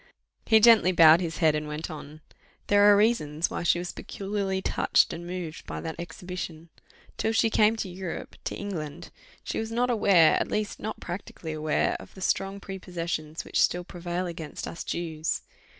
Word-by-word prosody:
He 220 -1 +6
gently 220 -4 +7
bowed 165 -1 +7
his 165 -3 -3
head 160 -3 +4
and 150 0 -2
went 155 +4 -5
on. 155 0 -9 0.4
"There 205 0 +6
are 205 - +6
reasons 170 -8 +1
why - - -3
she 170 0 +3
was 175 0 -4
peculiarly 195 -1 -3
touched - - +2
and 175 +1 -7
moved 175 -3 -6
by - - -5
that 160 +1 -6
exhibition. 170 -1 -7 0.5
Till 220 - 0
she 225 0 +3
came 215 +1 +4
to 220 - -3
Europe 180 -1 -6
to - - -3
England 175 -5 -6 0.3
she - - -3
was 220 0 -4
not 245 +2 +1
aware, 195 -8 +5
at - - -1
least 210 -1 -2
not 220 +1 -5
practically 175 -3 -6
aware, 155 0 0
of - - -13
the 190 - -11
strong 195 +1 0
prepossessions 170 -5 -5
which - - 0
still 180 0 +2
prevail 175 0 -4
against 165 -3 -6
us 165 - -6
Jews." 160 -2 -3
175 Hz, 180 wpm, -27 LUFS, 160-200 Hz, 0.5 s, gently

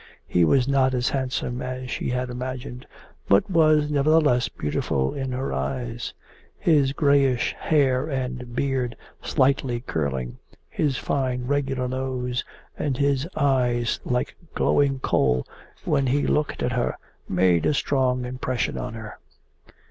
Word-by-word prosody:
He 90 - +2
was 125 - +3
not 130 -1 +3
as 125 -1 +1
handsome 130 -2 -2
as 130 0 -5
she - - -2
had 125 0 -2
imagined, 125 +1 -6 0.4
but 100 0 +5
was 155 -3 +4
nevertheless 145 -3 +3
beautiful 70 -2 -1
in 135 -2 -3
her 130 +2 -2
eyes: 120 - -3 0.4
his 145 -5 +3
greyish 140 -4 +2
hair 135 -3 +2
and 125 -3 -4
beard, 130 -4 -1 0.3
slightly 130 -2 +1
curling, 65 - -3 0.3
his 140 -5 0
fine, 130 -2 -1
regular 135 -2 0
nose, 125 -1 -2 0.3
and 135 -4 -2
his 140 +1 +1
eyes 125 -5 +1
like 125 0 -1 0.2
glowing 140 -1 +2
coal 65 - +2 0.4
when 140 -3 +2
he 140 +3 +2
looked 150 -1 0
at 125 - 0
her, 120 0 -1 0.3
made 90 -2 +3
a - - +3
strong 130 -3 +1
impression 125 0 -2
on 115 - -5
her. 110 -1 -9
130 Hz, 135 wpm, -24 LUFS, 125-140 Hz, 0.4 s, but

